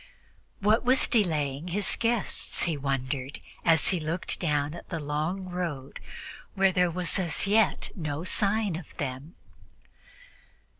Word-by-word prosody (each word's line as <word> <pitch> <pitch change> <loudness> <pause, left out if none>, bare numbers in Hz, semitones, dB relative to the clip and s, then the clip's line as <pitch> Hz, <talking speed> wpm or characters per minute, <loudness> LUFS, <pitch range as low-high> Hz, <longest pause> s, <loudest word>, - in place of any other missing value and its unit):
What 210 +3 +3
was 255 +2 +5
delaying 155 - 0
his 195 +3 +2
guests? 230 -3 0
he 165 -2 +1
wondered, 135 -1 -3 0.2
as 165 -2 +4
he 185 - +1
looked 165 +3 -2
down 150 -1 -1
the 165 - -3
long 155 +6 -2
road, 160 -7 -4 0.6
where 195 0 +4
there 180 -1 +3
was 180 +3 -1
as 170 -2 +1
yet 210 +1 +2
no 155 -3 -3
sign 200 0 +1
of 170 - -9
them. 140 +2 -5
170 Hz, 130 wpm, -28 LUFS, 145-195 Hz, 0.6 s, was